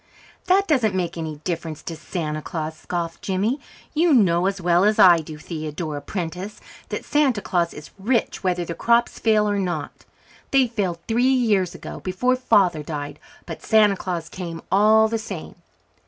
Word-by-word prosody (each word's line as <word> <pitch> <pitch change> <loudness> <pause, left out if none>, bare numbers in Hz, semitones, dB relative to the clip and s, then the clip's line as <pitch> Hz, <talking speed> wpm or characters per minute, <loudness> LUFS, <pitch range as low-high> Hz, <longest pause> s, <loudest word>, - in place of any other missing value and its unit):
"That 390 +2 +3
doesn't 235 - +2
make 180 -2 -1
any 160 -2 -4
difference 165 -3 -4
to 165 - -5
Santa 155 -1 -4
Claus," 160 0 -4
scoffed 170 0 -4
Jimmy. 205 +8 -1 0.3
"You 320 -1 +4
know 180 -5 +3
as 195 0 -2
well 175 0 +3
as 210 +1 +3
I 175 -3 +7
do, 155 -1 -8
Theodora 155 -1 -5
Prentice, 180 +5 -5 0.3
that - - -4
Santa 280 -7 +2
Claus 175 -3 0
is 150 - -11
rich 225 +2 0
whether 180 -2 0
the 170 - -4
crops 235 +6 +1
fail 215 -2 +3
or 205 -1 0
not. 175 -6 -4 0.4
They 270 -1 +4
failed 205 -7 -2
three 235 +2 +2
years 215 -9 +2
ago, - - -8
before 250 +8 0
Father 200 -10 +3
died, 145 -1 -6 0.3
but - - -7
Santa 215 -3 +4
Claus 175 -3 -4
came 170 -2 -7
all 215 +3 +5
the 225 0 -2
same. 195 -7 -7
185 Hz, 170 wpm, -23 LUFS, 165-220 Hz, 0.4 s, I